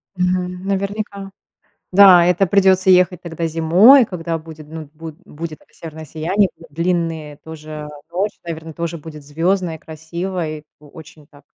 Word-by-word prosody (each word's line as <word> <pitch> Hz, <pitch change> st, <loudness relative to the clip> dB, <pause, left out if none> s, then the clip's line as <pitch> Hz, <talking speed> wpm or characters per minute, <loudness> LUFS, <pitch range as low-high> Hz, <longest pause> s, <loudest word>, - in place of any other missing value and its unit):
Мгм. 180 Hz, 0 st, -1 dB
Наверняка. 200 Hz, 0 st, -3 dB, 0.6 s
Да, 185 Hz, -2 st, +8 dB
это 180 Hz, +2 st, +2 dB
придется 190 Hz, 0 st, +3 dB
ехать 180 Hz, -1 st, +4 dB
тогда 170 Hz, -1 st, -4 dB
зимой, 180 Hz, -, +6 dB
когда 170 Hz, -5 st, -4 dB
будет 155 Hz, -1 st, -12 dB
ну 160 Hz, -1 st, -8 dB
буд 160 Hz, -1 st, -9 dB
будет 155 Hz, 0 st, -8 dB
это -, -, -29 dB
северное 160 Hz, -1 st, -9 dB
сияние, 175 Hz, +7 st, 0 dB, 0.2 s
длинные 165 Hz, -2 st, -2 dB
тоже. 155 Hz, -1 st, -9 dB, 0.2 s
Ночь 200 Hz, +3 st, -2 dB
наверное 160 Hz, -1 st, -7 dB
тоже 170 Hz, +1 st, -4 dB
будет 150 Hz, -1 st, -11 dB
звездной, 165 Hz, +3 st, -1 dB
красивой, 160 Hz, 0 st, -5 dB
о 150 Hz, -, -18 dB
очень 155 Hz, 0 st, -14 dB
так 145 Hz, -1 st, -20 dB
165 Hz, 140 wpm, -19 LUFS, 155-185 Hz, 0.6 s, Да